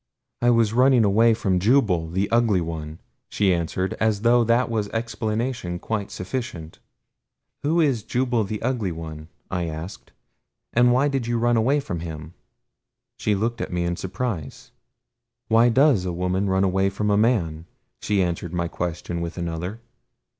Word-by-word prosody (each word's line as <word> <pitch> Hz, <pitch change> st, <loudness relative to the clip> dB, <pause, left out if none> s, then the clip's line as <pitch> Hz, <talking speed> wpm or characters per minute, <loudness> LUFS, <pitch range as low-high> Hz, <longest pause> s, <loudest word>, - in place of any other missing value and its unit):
"I 120 Hz, -, +4 dB
was 115 Hz, -3 st, +3 dB
running 125 Hz, -1 st, +5 dB
away 110 Hz, +3 st, +4 dB
from 95 Hz, -4 st, 0 dB
Jubal 95 Hz, -7 st, +2 dB
the 95 Hz, +4 st, 0 dB
Ugly 115 Hz, -5 st, +3 dB
One," 80 Hz, -2 st, -5 dB, 0.3 s
she 100 Hz, -3 st, +2 dB
answered, 90 Hz, +2 st, -1 dB
as 110 Hz, -2 st, +1 dB
though 120 Hz, +1 st, +4 dB
that 115 Hz, +2 st, +2 dB
was 110 Hz, -3 st, -2 dB
explanation 115 Hz, -3 st, -2 dB
quite 105 Hz, +2 st, -3 dB
sufficient. 90 Hz, -6 st, -6 dB, 0.8 s
"Who 160 Hz, +4 st, +1 dB
is 140 Hz, -8 st, +2 dB
Jubal 120 Hz, +1 st, 0 dB
the 105 Hz, +1 st, -4 dB
Ugly 115 Hz, -8 st, -1 dB
One?" 80 Hz, -1 st, -8 dB, 0.2 s
I 90 Hz, -2 st, -1 dB
asked. 80 Hz, +4 st, -7 dB, 0.6 s
"And 120 Hz, +1 st, +5 dB
why 130 Hz, +4 st, +3 dB
did 135 Hz, -4 st, -1 dB
you 120 Hz, 0 st, 0 dB
run 120 Hz, +1 st, +2 dB
away 130 Hz, +6 st, +3 dB
from 90 Hz, -11 st, -4 dB
him?" 80 Hz, -1 st, -7 dB, 0.9 s
She 105 Hz, -, +1 dB
looked 115 Hz, +3 st, -2 dB
at -, -, -4 dB
me 90 Hz, 0 st, -1 dB
in 85 Hz, 0 st, -1 dB
surprise. 95 Hz, -, -5 dB, 0.8 s
"Why 115 Hz, +2 st, +5 dB
DOES 130 Hz, -6 st, +4 dB
a 90 Hz, -, -1 dB
woman 90 Hz, +3 st, -1 dB
run 95 Hz, 0 st, +2 dB
away 95 Hz, 0 st, +2 dB
from 105 Hz, +2 st, -1 dB
a -, -, +4 dB
man?" 90 Hz, -8 st, +1 dB, 0.3 s
she 100 Hz, -2 st, +1 dB
answered 85 Hz, -1 st, -3 dB
my 85 Hz, 0 st, 0 dB
question 85 Hz, 0 st, -4 dB
with 85 Hz, +1 st, -5 dB
another. 85 Hz, +5 st, -4 dB
100 Hz, 160 wpm, -23 LUFS, 85-120 Hz, 0.9 s, running